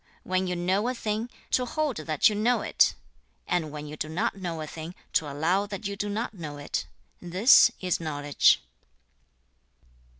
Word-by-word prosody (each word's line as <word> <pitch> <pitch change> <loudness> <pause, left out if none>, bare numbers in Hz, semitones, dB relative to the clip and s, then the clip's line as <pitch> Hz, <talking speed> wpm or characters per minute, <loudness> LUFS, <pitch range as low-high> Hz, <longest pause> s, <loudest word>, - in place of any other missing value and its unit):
When 185 0 0
you 180 - -1
know 185 +5 0
a 255 - -1
thing, 220 +1 -2 0.2
to 255 - +3
hold 290 0 -1
that 155 -1 +2
you 215 - +2
know 225 +4 +2
it; - - +3 0.5
and 175 -3 0
when 150 0 -7
you 150 0 -7
do 155 0 -4
not 160 +4 -1
know 175 -4 -4
a - - -4
thing, 160 +3 -8 0.2
to 155 -5 +1
allow 175 +8 +1
that 205 +1 -7
you 200 0 -2
do 205 +1 -3
not 220 +4 -3
know 155 -7 -7
it; 145 - -3 0.3
this 185 +8 +6
is 180 -2 0
knowledge.' 145 -3 +2
180 Hz, 175 wpm, -27 LUFS, 155-210 Hz, 0.5 s, this